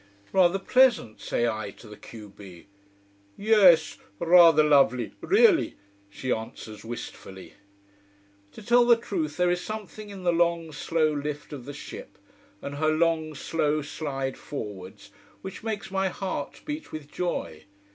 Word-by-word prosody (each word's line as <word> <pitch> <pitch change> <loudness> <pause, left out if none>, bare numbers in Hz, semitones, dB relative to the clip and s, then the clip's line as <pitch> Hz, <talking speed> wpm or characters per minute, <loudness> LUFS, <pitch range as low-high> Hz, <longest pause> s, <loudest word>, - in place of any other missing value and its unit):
"Rather 185 0 +4
pleasant!" 235 - +2
say 120 - 0
I 110 -3 -3
to - - -15
the 105 - -11
q 105 0 -12
b. 95 -3 -13 0.7
"Yes. 200 -6 +5 0.2
Rather 165 - +6
lovely 140 -5 +3
really," 410 -4 +4 0.3
she 125 +5 -5
answers 110 -1 -5
wistfully. 110 -4 -9 1.0
To - - -11
tell 240 +3 +5
the 240 - +7
truth 170 -10 -4
there 180 0 +2
is 175 0 -1
something 215 0 -7
in 195 -2 -9
the 175 -1 +2
long, 170 -1 +1
slow 155 +1 0
lift 150 +1 -5
of 130 -4 -8
the 145 - -6
ship, 145 - -10 0.5
and 140 0 -6
her 155 +1 +1
long, 160 -1 +1
slow 150 0 -1
slide 135 -3 -4
forwards 105 -9 -8 0.3
which 190 - -7
makes 215 -4 -5
my 190 0 0
heart 185 -6 -5
beat 300 +1 -6
with 150 -2 -8
joy. 150 - -4
155 Hz, 145 wpm, -26 LUFS, 135-190 Hz, 1.0 s, the